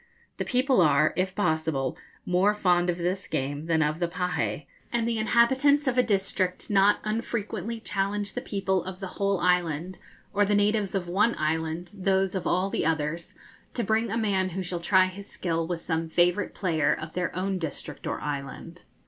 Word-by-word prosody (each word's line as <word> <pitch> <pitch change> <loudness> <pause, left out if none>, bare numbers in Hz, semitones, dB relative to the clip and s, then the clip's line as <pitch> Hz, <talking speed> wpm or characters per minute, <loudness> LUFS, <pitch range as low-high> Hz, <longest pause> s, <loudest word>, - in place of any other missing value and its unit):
The - - -2
people 255 -3 +3
are, 155 -1 +4
if 185 0 -1
possible, 155 -8 0 0.3
more 190 +4 +3
fond 180 -3 +2
of 175 - 0
this 185 +3 -2
game 145 +2 -3
than 160 -1 +3
of 150 +2 -1
the 175 - +1
pahé, 170 -4 -2 0.3
and 235 -1 0
the 230 -1 0
inhabitants 265 +6 +4
of 260 -2 +1
a 250 - +5
district 195 -4 -1
not 200 +1 +5
unfrequently 225 +1 -3
challenge 200 -1 -2
the - - -3
people 190 -3 -1
of 185 0 -7
the 190 0 -8
whole 200 -1 +2
island, 180 -1 0 0.3
or 205 0 +3
the 205 +1 +2
natives 205 -1 +1
of 180 -2 -1
one 205 +7 +2
island 160 +2 -2
those 190 -1 +1
of 190 - -2
all 185 +2 +1
the - - 0
others, 160 +1 -2 0.4
to 240 - -1
bring 220 +1 +1
a 225 - -1
man 195 -4 +1
who 190 - -1
shall 175 -1 -3
try 185 +2 +4
his 195 +2 -8
skill 165 -2 -2
with 170 -1 -3
some 160 -1 -2
favourite 175 +4 +2
player 160 -6 +1
of 155 +1 -7
their 180 -1 -2
own 190 +1 -1
district 150 -2 -4
or - - -2
island. 145 +4 -6
185 Hz, 185 wpm, -27 LUFS, 165-205 Hz, 0.4 s, a